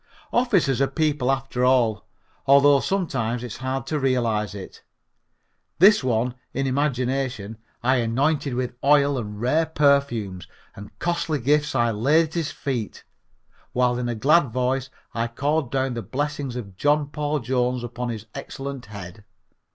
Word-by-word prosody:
Officers 190 - +2
are 135 - +4
people 150 -5 0
after 135 -2 -2
all, 125 -5 +2 0.4
although 140 +1 +6
sometimes 125 - -1
it's 120 -4 -6
hard 130 0 -3
to 150 +2 -2
realize 115 -7 0
it. 95 -2 -9 1.0
This 195 -1 +6
one, 120 0 0 0.2
in 135 +1 0
imagination, 130 -5 -1 0.2
I 130 +2 +3
anointed 135 +4 0
with 125 -1 -2
oil 145 0 +4
and 105 -2 -6
rare 155 +8 +1
perfumes, 140 - +1 0.3
and 105 +1 -10
costly 170 -3 -1
gifts 145 +3 +1
I 120 -2 +2
laid 150 +9 +3
at - - -17
his 165 -3 -1
feet, 125 -6 -4 0.7
while 125 -1 +2
in 120 -1 -2
a 120 - -2
glad 140 +5 +4
voice 130 +2 -1 0.2
I 115 0 -1
called 140 +3 -1
down 135 -1 0
the 120 - -4
blessings 145 +3 -3
of 100 -6 -7
John 145 +3 +2
Paul 150 0 -1
Jones 125 -1 -1
upon 120 +1 -4
his 110 -2 -5
excellent 135 -2 -7
head. 100 -1 -9
130 Hz, 150 wpm, -24 LUFS, 120-145 Hz, 1.0 s, although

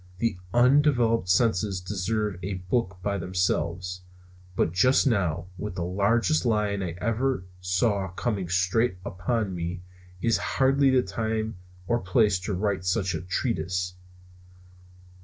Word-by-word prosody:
The 115 0 0 0.2
undeveloped 120 -5 +3
senses 100 -2 +2
deserve 100 +1 -2
a 95 +1 -3
book 90 +1 -1
by 100 -1 -1
themselves. 90 0 -1 0.5
But 80 - +1
just 125 - +4
now, 90 - +1
with 105 -3 -4
the 90 - -2
largest 105 - +2
lion 105 -4 +1
I 85 -3 -3
ever 115 -1 0
saw 95 +2 +1
coming 95 -1 -3
straight 95 +4 +1
upon 100 +2 -2
me, 85 +1 -4 0.4
is 115 +3 +2 0.2
hardly 135 +1 +4
the 130 -1 +4
time 110 +1 -2 0.3
or 120 +5 +1
place 95 0 +2
to 95 +3 -3
write 95 -1 -1
such 95 0 0
a 80 - -3
treatise. 90 -2 -2
100 Hz, 130 wpm, -26 LUFS, 90-115 Hz, 0.5 s, just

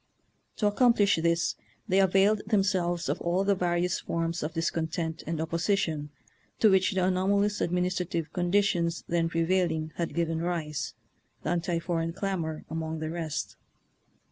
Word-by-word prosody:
To 210 - -1
accom 240 +2 +4
plish 205 -3 +4
this 170 0 +2 0.3
they 190 +1 +3
availed 195 +2 +4
themselves 185 -5 +1
of - - -1
all 175 +3 +1
the 200 0 +3
various 180 -1 0
forms 165 0 -2
of 155 +2 -4
discontent 165 0 -2
and 165 -1 -2
op 160 0 -3
position 165 -4 0 0.5
to 215 - +5
which 190 +2 +3
the 185 -1 +2
anomalous 200 +3 +2
admin 180 +1 +1
istrative 175 -3 -2
conditions 175 -2 +1
then 165 -1 +1
prevailing 165 -2 0
had 170 -1 -2
given 165 -1 0
rise, 165 -4 -3 0.5
the - - -1
anti 175 0 0
foreign 165 -1 -2
clamor 170 -5 -3
among 160 0 -3
the 155 0 -4
rest. 165 -3 -4
175 Hz, 150 wpm, -28 LUFS, 165-190 Hz, 0.5 s, to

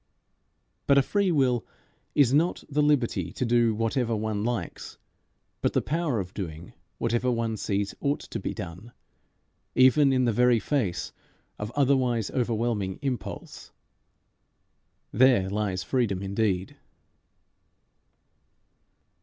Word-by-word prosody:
But 140 - +5
a 140 - +6
free 200 +4 +1
will 130 -6 +2 0.5
is 135 -3 +4
not 165 +5 +2
the 150 +1 0
liberty 120 - +1
to 130 - -2
do 115 -2 +3
whatever 115 +1 0
one 105 -1 -2
likes, 115 -7 -4 0.6
but - - +1
the - - +2
power 155 -6 -1
of 95 0 -5
doing 85 -3 -7 0.2
whatever 120 +2 0
one 115 -2 -1
sees 100 -1 -2
ought 145 0 -1
to - - -6
be - - -3
done, 90 +8 -8 0.8
even 135 +2 +5
in 130 -1 +2
the 120 - +2
very 125 +1 +4
face 110 -6 -1 0.5
of 105 +1 -4
otherwise 130 -6 +2
overwhelming 115 -5 -1
impulse. 130 -6 -5 1.4
There 120 -5 +4
lies 100 -3 -1
freedom 105 -8 0
indeed. 100 -2 -1
120 Hz, 120 wpm, -27 LUFS, 105-130 Hz, 1.4 s, a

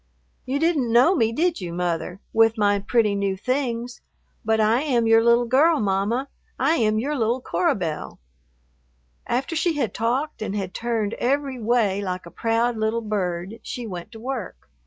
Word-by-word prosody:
"You 265 +2 0
didn't 295 -6 +1
know 250 +10 +5
me, 225 -10 +2
did 335 +7 0
you, 175 -2 -5
Mother, 175 +2 -3
with 225 0 +4
my 205 -1 +2
pretty 215 0 +1
new 200 -1 -1
things? 245 0 -2 0.4
But 220 0 +1
I 220 +4 +3
am 250 -6 +1
your 225 0 +5
little 235 +1 +4
girl, 290 +7 +4
Mamma. 210 +6 0 0.3
I 295 +6 +2
am 215 -2 +2
your 280 +7 -1
little 235 0 0
Cora 180 -7 0
Belle." 165 -6 -4 1.1
After 270 +7 -1
she 335 +1 +1
had 280 -8 -2
talked 255 +6 -1
and 210 -2 -3
had 190 -3 -3
turned 230 -3 -2
every 270 0 0
way 215 -4 +1
like 185 -2 -4
a 170 - -11
proud 230 +1 0
little 220 +1 0
bird, 195 -1 -3
she 245 - -6
went 185 -1 -7
to 225 - -10
work. 245 -5 -6
230 Hz, 175 wpm, -23 LUFS, 205-255 Hz, 1.1 s, know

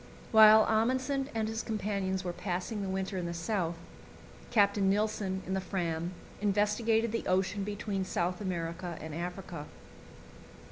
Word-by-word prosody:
While 220 0 +9
Amundsen 260 +5 +1
and 220 -1 0
his 225 +1 -2
companions 200 -3 -2
were 175 -1 -3
passing 185 +4 -3
the 195 - -3
winter 190 0 -2
in 175 - -3
the 170 - -4
South, 170 -1 -1 0.7
Captain 200 -3 +3
Nilsen, 200 -2 0
in 190 - -3
the 190 - 0
Fram, 175 -2 -2 0.3
investigated 210 +2 +2
the 230 - -2
ocean 190 +2 +1
between 205 -1 -2
South 180 0 -1
America 175 -2 -3
and 155 0 -7
Africa. 175 -2 -5
195 Hz, 140 wpm, -31 LUFS, 180-215 Hz, 0.7 s, While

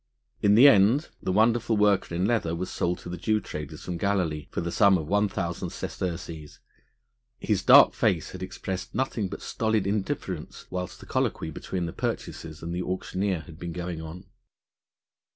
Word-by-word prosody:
In 105 -1 +5
the 125 +6 +9
end 115 - +5
the 95 - -1
wonderful 115 +2 +3
worker 100 -4 +2
in 90 +2 +1
leather 100 -7 +1
was 90 +2 -4
sold 90 +1 -1
to - - -8
the 90 - -5
Jew 110 +4 +1
traders 75 -5 -7
from 90 -1 -3
Galilee 85 -6 -1
for - - -4
the 85 0 -2
sum 100 0 +5
of 80 - -4
one 105 +3 +2
thousand 85 -4 -3
sesterces; 85 -4 -5 0.8
his - - 0
dark - - +8
face - - 0
had - - -9
expressed 95 -1 -5
nothing 125 -6 -1
but - - -7
stolid 110 -3 0
indifference 100 - -3
whilst 90 -1 -5
the - - -11
colloquy - - -1
between 90 -2 -4
the 85 - -5
purchasers 80 0 -4
and 85 +1 -4
the 90 - -2
auctioneer 95 0 -2
had 80 -1 -13
been 85 -1 -5
going 85 -1 -4
on. 80 +4 -9
90 Hz, 175 wpm, -27 LUFS, 85-105 Hz, 0.8 s, the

